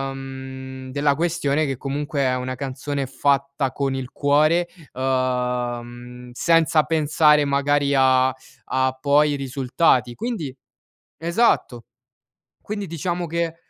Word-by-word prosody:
mhmm, 130 0 -8
della 140 +1 +1
questione 155 -2 0
che 135 -2 -3
comunque 140 +1 -3
è 130 -1 +2
una 130 0 -3
canzone 140 +1 -4
fatta 140 0 0
con 135 0 -1
il 130 -1 -5
cuore, 155 +4 +2 0.3
uhm, 130 - -7 0.8
mhmm, 125 +1 -11
senza 165 +2 +3
pensare 150 -1 +3
magari 140 0 +1
a 130 -1 +4 0.4
a 130 0 +1
poi 145 +2 +3
i - - 0
risultati. 130 -2 +1
Quindi 170 - -4 0.6
esatto. 170 - +1 0.8
Quindi, 205 -1 -4
diciamo, 175 +2 -3
che 165 0 -2
140 Hz, 120 wpm, -22 LUFS, 130-155 Hz, 0.8 s, a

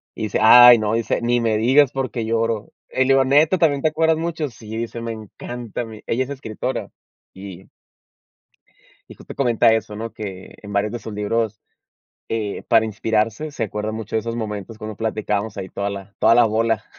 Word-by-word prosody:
Y - - -5
dice: 105 - -1
"Ay 120 +2 +9
no, 110 0 -1
dice, 115 0 0
ni 120 0 +2
me 110 -2 +1
digas 130 +4 +4
porque 130 -4 -3
lloro". 115 -1 -1 0.2
Y - - -5
le 130 - +4
digo: 135 0 +5
"Neta, 150 +7 +4
¿también 145 -5 +2
te 155 - +2
acuerdas 160 +1 +2
mucho?" 160 -3 -3
Sí, 110 -2 -9
dice: 115 0 -5
"Me 115 0 -4
encanta 115 +2 -7
a - - -4
mí". 110 -1 -11
Ella 125 +3 0
es - - -13
escritora, 130 -6 -5 0.4
y 95 -1 -10 1.4
y - - -11
justo - - -11
comenta 120 -4 +3
eso, 105 -2 -2
¿no?, 115 +1 -5
que 95 -3 -8
en 105 -1 -9
varios 100 +1 0
de 120 - -4
sus 110 - -8
libros, 110 +1 -1 0.7
eh, 110 -3 -3
para 115 -1 +5
inspirarse, 110 +6 -1
se 135 -6 -3
acuerda 105 +1 -4
mucho 110 0 -4
de 110 - +2
esos 115 +1 -5
momentos 105 -1 -5
cuando 110 -1 -7
platicábamos 110 -1 -2
ahí 95 -1 -5
toda 100 0 -3
la 100 0 -8
toda 115 +1 +5
la 120 - +6
bola. 110 0 0
115 Hz, 200 wpm, -21 LUFS, 105-120 Hz, 1.4 s, Ay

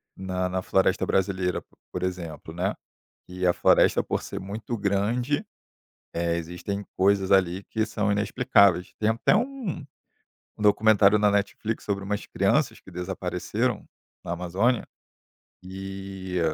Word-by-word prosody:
na 95 -1 -2
na 95 0 -1
floresta 95 0 +2
brasileira, 95 -2 0 0.3
por 90 - -4
exemplo, 85 -4 -5
né, 95 +5 -1 0.6
e 90 0 -2
a 90 - +5
floresta - - +4
por - - -2
ser - - -6
muito 105 +5 -5
grande, 115 - 0 0.7
eh, 85 0 0
existem 90 +4 -4
coisas 95 0 +3
ali 95 0 +3
que 110 -1 -1
são 105 -1 -1
inexplicáveis. 100 -2 +3
Tem 110 - +2
até 115 +9 +3
um 235 - -2 0.7
um 105 - -6
documentário 105 0 +5
na 105 0 +4
Netflix 100 +2 -1
sobre 100 -1 -2
umas 105 +1 -3
crianças - - +1
que - - -15
desapareceram 95 +5 -2 0.4
na 85 - -3
Amazônia, 95 +8 0 0.8
e 95 -1 -5
95 Hz, 130 wpm, -26 LUFS, 90-105 Hz, 0.8 s, a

